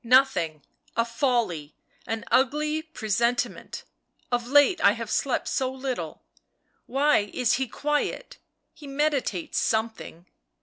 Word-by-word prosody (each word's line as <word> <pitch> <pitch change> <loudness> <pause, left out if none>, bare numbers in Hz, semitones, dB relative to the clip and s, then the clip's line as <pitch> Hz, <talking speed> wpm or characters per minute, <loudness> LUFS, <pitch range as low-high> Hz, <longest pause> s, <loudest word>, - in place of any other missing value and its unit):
" - - -47 0.2
Nothing 165 - -3 0.2
— - - -35
a 230 - +3
folly, 230 - -1 0.3
an 225 0 -3
ugly 300 +4 +2
presentiment, 235 -6 -1 0.5
of 240 -1 0
late 290 +6 +5
I 200 - +7
have 230 -1 -6
slept 270 - 0
so 260 -1 0
little. 260 -1 -5 0.6
Why 270 -6 +2
is 245 -2 +2
he 265 - 0
quiet? 295 - -2 0.3
He 295 - -12
meditates 275 - 0
something." 220 -6 -2
250 Hz, 125 wpm, -26 LUFS, 220-285 Hz, 0.6 s, I